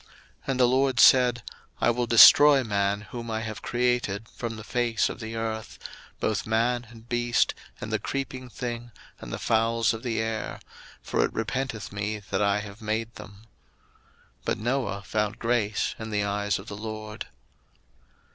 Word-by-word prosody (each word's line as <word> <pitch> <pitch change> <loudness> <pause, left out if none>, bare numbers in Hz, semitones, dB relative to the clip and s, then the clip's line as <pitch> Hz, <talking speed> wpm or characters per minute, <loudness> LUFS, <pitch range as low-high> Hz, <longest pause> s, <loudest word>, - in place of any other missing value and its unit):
01:006:007 - - -26 0.4
And 135 -2 -1
the 125 - +6
LORD 130 0 +2
said, 125 -3 +6 0.4
I - - +3
will 120 0 -1
destroy 135 +4 +8
man 100 -2 0
whom 115 +2 -8
I 110 0 -2
have 110 -1 -6
created 120 -4 -1
from 115 -2 -5
the 110 - -9
face 120 -1 0
of - - -7
the 110 -1 -6
earth; 110 -1 -4 0.4
both 110 -1 -1
man, 120 +2 +1
and 115 -1 -15
beast, 120 -1 +1 0.3
and 110 - -6
the 110 - +1
creeping 130 +1 -4
thing, 120 -1 -5 0.3
and - - -9
the - - -3
fowls 115 0 +1
of 110 - -6
the 115 -3 -2
air; 110 0 -3 0.4
for - - +1
it - - -1
repenteth 115 -1 -3
me 105 +1 -3
that 95 0 +1
I 100 0 +2
have 100 +1 -10
made 110 +1 -2
them. 100 +1 -12 1.0
01:006:008 - - -32
But - - 0
Noah 120 -3 -2
found 105 +1 -1
grace 115 -3 0
in 110 0 -6
the 105 -1 0
eyes 100 0 0
of 95 - -10
the 100 - -7
LORD. 110 0 -6
115 Hz, 175 wpm, -26 LUFS, 105-120 Hz, 1.0 s, destroy